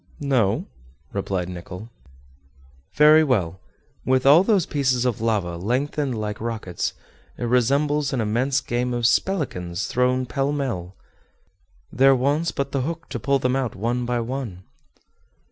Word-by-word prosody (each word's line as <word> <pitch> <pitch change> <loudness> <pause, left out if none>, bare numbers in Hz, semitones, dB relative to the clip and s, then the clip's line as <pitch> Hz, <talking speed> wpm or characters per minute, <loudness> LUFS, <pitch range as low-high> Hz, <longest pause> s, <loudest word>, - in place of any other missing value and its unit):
"No," 130 -9 +1 0.5
replied 90 -3 -2
Nicholl. 90 +5 -8 1.0
"Very 155 +1 +7
well; 95 - 0 0.4
with 130 0 +1
all 145 +5 +8
those 195 -5 +2
pieces 130 -4 0
of 120 -4 -1
lava 100 -7 0
lengthened 130 - -1
like 105 0 -4
rockets, 110 -6 -3 0.4
it - - -5
resembles 140 +4 +2
an 130 - -1
immense 125 +5 +1
game 125 0 -2
of 120 - -3
spelikans 100 - 0
thrown 125 +1 +1
pellmell. 135 -9 -2 1.0
There 135 +1 +5
wants 145 +6 +1
but 140 0 -3
the 135 - 0
hook 165 +4 -5
to 120 - -4
pull 140 +5 +2
them 130 -1 0
out 130 -4 -2
one 120 +5 -1
by 120 -1 0
one." 115 -7 -5
125 Hz, 135 wpm, -23 LUFS, 110-140 Hz, 1.0 s, all